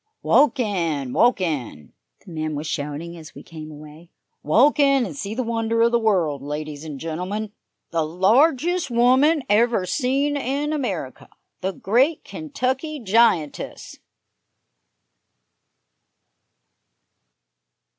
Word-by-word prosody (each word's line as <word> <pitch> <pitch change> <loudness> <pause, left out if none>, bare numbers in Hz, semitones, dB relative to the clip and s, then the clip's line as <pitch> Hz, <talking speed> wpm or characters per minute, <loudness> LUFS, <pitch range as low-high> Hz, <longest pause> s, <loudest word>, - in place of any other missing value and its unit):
"Walk 285 -2 +4
in! 165 - -1
Walk 245 -2 +3
in!" 130 - -4 0.3
the 185 - -12
man 155 -1 -3
was 150 +2 -4
shouting 150 +3 -4
as 160 -1 -12
we - - -11
came 155 -2 -10
away. 155 +3 -13 0.3
"Walk 255 - +3
in 275 -3 +4
and 170 -8 -7
see 200 +8 -5
the 255 - -1
wonder 230 0 0
of 235 - +3
the 235 - +3
world, 175 - +1
ladies 150 +1 -6
and 150 -4 -7
gentlemen 185 +7 -4 0.4
the 165 -1 0
largest 265 - +2
woman 260 +6 +3
ever 215 -1 +2
seen 275 +6 0
in 285 +2 -2
America 280 -5 -4 0.3
the 190 0 -2
great 260 - +1
Kentucky 255 - -3
giantess!" 200 - 0
205 Hz, 115 wpm, -22 LUFS, 155-255 Hz, 0.4 s, Walk